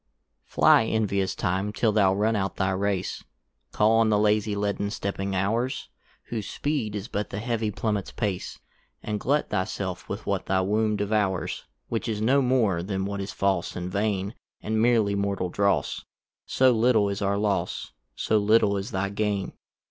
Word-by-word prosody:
FLY 115 - +5
envious 100 -4 0
Time, 95 +2 -1
till 110 +1 +1
thou 100 -3 +4
run 105 +3 +1
out 95 -2 -1
thy 95 -1 0
race, 95 -1 -1 0.5
Call 110 +2 +3
on 115 -1 +4
the 105 - +3
lazy 105 0 +2
leaden 100 0 -1
stepping 100 -1 -3
hours, 115 +7 -1 0.4
Whose 110 -4 -4
speed 135 -8 -2
is 105 +1 -4
but 105 -4 -3
the - - -5
heavy 115 0 -1
Plummets 105 -1 -2
pace; 100 -5 -3 0.5
And 105 -1 -2
glut 145 +6 0
thy 95 -3 +1
self 95 -2 -5
with - - -5
what - - -2
thy 95 0 +2
womb 105 +3 +1
devours, 100 -2 -1 0.2
Which 115 +1 -2
is 110 -2 -2
no 130 +6 +3
more 120 -9 +2
then 95 +1 -2
what 100 0 -3
is 95 - -5
false 95 -3 0
and 90 0 -4
vain, 100 0 -1 0.3
And 110 0 -1
meerly 115 -4 +3
mortal 100 -2 -1
dross; 100 +2 0 0.4
So 130 -1 +4
little 115 -2 +3
is 100 0 -3
our 100 0 +1
loss, 100 -1 -1 0.2
So 110 - +1
little 105 -1 +3
is 95 +1 -4
thy 95 +1 -1
gain. 100 -1 -2
105 Hz, 170 wpm, -26 LUFS, 95-110 Hz, 0.5 s, FLY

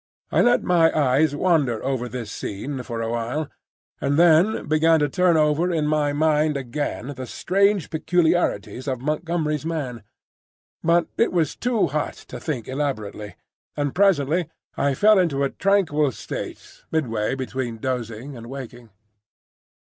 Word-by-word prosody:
I - - +3
let 245 0 +3
my 165 -2 +4
eyes 145 +1 +3
wander 145 -9 +1
over 130 -2 -1
this 115 -3 -6
scene 130 +9 -5
for 115 -2 -4
a 115 - -2
while, 120 +6 -2 0.5
and 140 +1 0
then 175 +5 +4
began 160 +1 +4
to 150 - +2
turn 175 +3 +2
over 155 +3 +2
in 160 -3 0
my 150 -1 +1
mind 150 0 +2
again 140 +1 -4
the 130 0 -6
strange 195 - +1
peculiarities 160 - 0
of 130 -2 -1
Montgomery's 155 +1 -1
man. 145 -8 -4 0.8
But 170 0 +3
it 230 - +3
was 165 -5 0
too 240 -3 +1
hot 150 +2 -2 0.2
to - - -5
think 130 -9 -4
elaborately, 110 -8 -4 0.4
and 145 -2 -1
presently 170 -4 +2 0.3
I 140 -1 +1
fell 210 +5 +5
into 145 -6 +1
a 140 - 0
tranquil 160 -8 +2
state - - -7
midway 115 -7 0
between 130 -3 -4
dozing 125 +1 -4
and 115 -1 -9
waking. 120 -3 -9
145 Hz, 145 wpm, -23 LUFS, 130-165 Hz, 0.8 s, fell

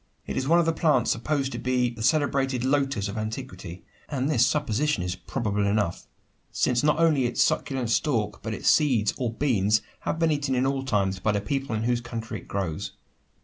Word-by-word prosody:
It - - -5
is 130 - -1
one 170 +3 +5
of 170 - +3
the 165 - +2
plants 150 -7 +2
supposed 135 +3 -1
to - - -5
be 125 -1 +1
the 115 -2 -9
celebrated 135 -1 +1
"lotus" 135 -6 +1
of 100 +2 -4
antiquity; 110 -5 -6 0.3
and 135 -2 -1
this 120 -7 +3
supposition 145 -5 0
is 90 0 -2
probable 105 0 -2
enough: 100 -4 -1 0.4
since 120 -1 +1
not 150 0 +2
only 155 -6 +3
its 120 - +2
succulent 130 -5 -1
stalk, 115 -6 0
but 110 -1 -4
its - - -4
seeds 125 -9 +3
or 120 -3 -1
"beans," 110 -5 +1 0.2
have - - -2
been 165 -1 +2
eaten 145 -3 0
in 125 +1 +1
all 135 0 0
times 100 -7 0
by 110 +4 +1
the 100 - +1
people 135 +3 -2
in 110 - -2
whose 120 0 +1
country 115 -1 -6
it - - -16
grows. 95 -6 -3
125 Hz, 200 wpm, -26 LUFS, 110-140 Hz, 0.4 s, one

